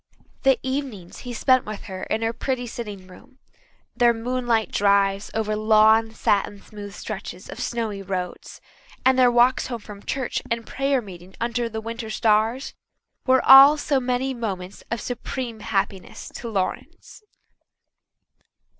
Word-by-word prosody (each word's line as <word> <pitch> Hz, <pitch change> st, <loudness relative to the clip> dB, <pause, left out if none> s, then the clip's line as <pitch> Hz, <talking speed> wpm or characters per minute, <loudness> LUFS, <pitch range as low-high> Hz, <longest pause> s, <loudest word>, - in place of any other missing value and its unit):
The 270 Hz, -2 st, +4 dB
evenings 260 Hz, -9 st, -4 dB
he -, -, -3 dB
spent 255 Hz, +2 st, +3 dB
with 215 Hz, -1 st, -7 dB
her 190 Hz, -1 st, -7 dB
in 220 Hz, +1 st, -2 dB
her 225 Hz, +1 st, 0 dB
pretty 255 Hz, 0 st, -2 dB
sitting 210 Hz, -5 st, -7 dB
room, 185 Hz, +8 st, -17 dB, 0.6 s
their 240 Hz, -2 st, +4 dB
moonlight 240 Hz, -1 st, -1 dB
drives 200 Hz, 0 st, +2 dB
over 215 Hz, -1 st, 0 dB
long, 220 Hz, +1 st, +4 dB
satin 205 Hz, -2 st, 0 dB
smooth 205 Hz, 0 st, -10 dB
stretches 190 Hz, -3 st, -7 dB
of -, -, -9 dB
snowy 225 Hz, -4 st, -3 dB
roads, 185 Hz, -2 st, -5 dB, 0.4 s
and 260 Hz, 0 st, +5 dB
their 250 Hz, -1 st, +6 dB
walks 240 Hz, +2 st, +3 dB
home 240 Hz, -, -4 dB
from 205 Hz, -1 st, -11 dB
church 260 Hz, +2 st, -3 dB
and 230 Hz, -1 st, -2 dB
prayer 275 Hz, -2 st, 0 dB
meeting 185 Hz, -1 st, -12 dB
under 235 Hz, 0 st, -1 dB
the 220 Hz, 0 st, -5 dB
winter 230 Hz, 0 st, -6 dB
stars, 220 Hz, +4 st, +1 dB, 0.5 s
were 260 Hz, 0 st, +4 dB
all 275 Hz, +3 st, +10 dB
so 290 Hz, -2 st, +1 dB
many 255 Hz, +1 st, -1 dB
moments 195 Hz, -6 st, -5 dB
of 235 Hz, -, -2 dB
supreme 245 Hz, -1 st, -5 dB
happiness 195 Hz, -2 st, -3 dB
to 235 Hz, -, -7 dB
Lawrence. 195 Hz, -, -4 dB
225 Hz, 145 wpm, -23 LUFS, 205-250 Hz, 0.6 s, all